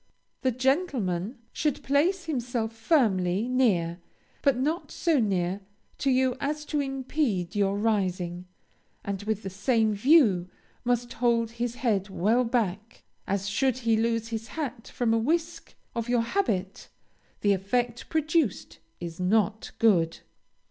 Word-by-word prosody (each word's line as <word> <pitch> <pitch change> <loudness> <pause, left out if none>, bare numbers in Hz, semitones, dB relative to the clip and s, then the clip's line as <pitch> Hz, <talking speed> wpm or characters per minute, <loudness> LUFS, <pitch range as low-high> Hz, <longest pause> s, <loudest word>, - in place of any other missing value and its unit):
The 260 - +2
gentleman 255 - 0 0.2
should 300 -3 -1
place 340 +7 +2
himself 245 -6 -2
firmly, 220 - +2
near, 190 -10 +1 0.4
but 275 -3 +3
not 305 +7 -1
so 330 -5 +1
near 190 -3 0 0.4
to 275 - +1
you 260 -1 +3
as 300 +2 -2
to 300 - -1
impede 270 - -1
your 200 -1 +1
rising, 185 -5 -1 0.6
and 200 -1 -3
with 215 0 -2
the 195 - -5
same 220 +3 +2
view 205 - +4 0.3
must 245 -1 0
hold 230 -1 +1
his 235 0 -3
head 210 -6 0
well 215 +7 +2
back, 225 -3 -2 0.2
as 200 0 -1
should 255 +5 +1
he 225 -1 +4
lose 230 0 0
his 225 0 -4
hat 265 -6 -5
from 235 -2 0
a 225 - +3
whisk 325 +7 -2 0.2
of 230 0 -3
your 240 -1 +3
habit 210 - -2 0.5
the 205 -1 +4
effect 235 +5 -1
produced 315 - 0 0.2
is 170 -1 -7
not 210 +3 +1
good. 175 -8 +3
230 Hz, 135 wpm, -27 LUFS, 195-260 Hz, 0.6 s, view